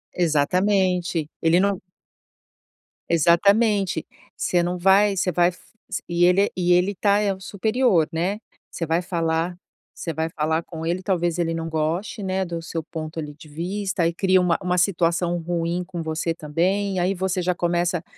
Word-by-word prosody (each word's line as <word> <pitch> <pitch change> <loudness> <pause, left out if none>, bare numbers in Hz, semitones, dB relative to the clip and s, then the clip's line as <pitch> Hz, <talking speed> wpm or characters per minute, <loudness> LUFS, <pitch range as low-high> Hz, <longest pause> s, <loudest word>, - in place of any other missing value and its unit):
Exatamente. 180 +1 +1
Ele 165 +2 +4
não 200 -1 +1 1.3
Exatamente. 195 +3 +3 0.3
Você 175 -1 +1
não 180 +1 -2
vai 195 +3 +4
você 180 -1 0
vai 175 +1 +3
f 180 - -12 0.3
s 190 - -3
e 175 0 +2
ele 190 +3 +4
e 180 -1 +2
ele 180 +3 +3
está 200 +1 +2
é 205 -2 +1
o 190 - -11
superior, 205 -2 +1
né. 180 +5 -1 0.3
Você 165 - -3
vai 165 +2 +1
falar 170 -1 -1 0.4
você 165 - -4
vai 160 +1 -2
falar 160 +1 -1
com 160 -2 -8
ele, 175 +3 -2
talvez 175 -3 0
ele 165 -1 0
não 165 0 -3
goste, 165 +8 -2
né, 190 0 -1
do 170 -2 -4
seu 165 -1 -4
ponto, 160 0 -6
ali, 150 -2 -5
de 155 - -14
vista, 180 +3 -2
e 170 - -1
cria 185 0 +3
uma 180 -1 +2
uma 180 -1 0
situação 175 -1 +1
ruim 170 +1 -2
com 175 -1 -6
você 160 +1 -2
também, 185 +6 -1
e - - 0
aí 180 +2 +1
você 190 0 -1
já 180 +1 +1
começa 175 0 0
175 Hz, 175 wpm, -23 LUFS, 165-190 Hz, 1.3 s, Ele